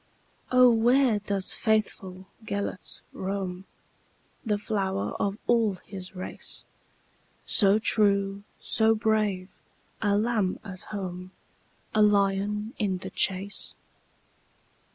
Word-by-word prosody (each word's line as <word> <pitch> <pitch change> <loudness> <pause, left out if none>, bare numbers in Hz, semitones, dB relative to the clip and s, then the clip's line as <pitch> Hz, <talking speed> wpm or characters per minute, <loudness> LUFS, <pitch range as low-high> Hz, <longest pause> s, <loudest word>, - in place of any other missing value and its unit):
"O, 255 -1 +7
where 235 0 +4
doth 200 -2 -1
faithful 195 -4 -1 0.2
Gêlert 200 -3 -4
roam, 190 -1 -4 0.8
The 210 -4 0
flower 195 - -2
of 200 0 0
all 225 -4 +3
his 190 -1 -8
race, 185 - -4 0.8
So 200 -1 +4
true, 200 -2 +2 0.2
so 225 0 +2
brave,—a 210 -1 -1
lamb 215 -4 +1
at 190 -4 -8
home,A 185 +2 -6
lion 210 +1 +2
in 195 -4 0
the 180 - -8
chase?" 195 +1 -1
200 Hz, 90 wpm, -27 LUFS, 190-220 Hz, 0.8 s, O